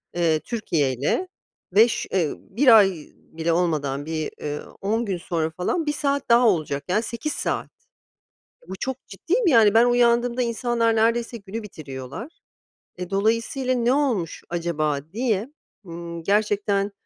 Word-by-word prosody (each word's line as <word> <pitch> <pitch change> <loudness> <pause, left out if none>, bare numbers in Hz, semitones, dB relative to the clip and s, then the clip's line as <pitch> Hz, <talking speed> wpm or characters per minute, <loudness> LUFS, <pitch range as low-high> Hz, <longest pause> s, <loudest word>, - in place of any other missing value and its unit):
eee, 165 -3 +2
Türkiye 160 - -1
ile. 145 - -1 0.5
Ve 220 +4 +7
ş - - -3
ııı, 165 -5 +1
1 230 +2 +5
ay 200 -2 +6 0.3
bile 165 +1 -3
olmadan 150 -5 0
bir, 160 -1 -3
ııı, 150 0 -6
10 225 +4 0
gün 195 -3 -2
sonra 165 -2 -2
falan 180 - -2
1 295 - 0
saat 280 -2 -1
daha 235 +1 +6
olacak. 155 -7 0
Yani 215 +5 +1
8 235 +7 -4
saat. - - -2 1.0
Bu 190 - -7
çok 265 0 -5
ciddiyim, 365 - -1
yani 225 -9 +6
ben 230 +2 +6
uyandığımda 245 0 +3
insanlar 235 -1 +1
neredeyse 230 +1 +1
günü 210 +2 -7
bitiriyorlar. 150 - -9 0.6
E, 180 0 -6
dolayısıyla 230 +6 0
ne 240 0 +2
olmuş 250 - 0
acaba 160 -4 -1
diye, 225 -1 -1 0.4
ımm, 170 0 -7
gerçekten, 205 +1 +1
210 Hz, 145 wpm, -23 LUFS, 170-240 Hz, 1.0 s, Ve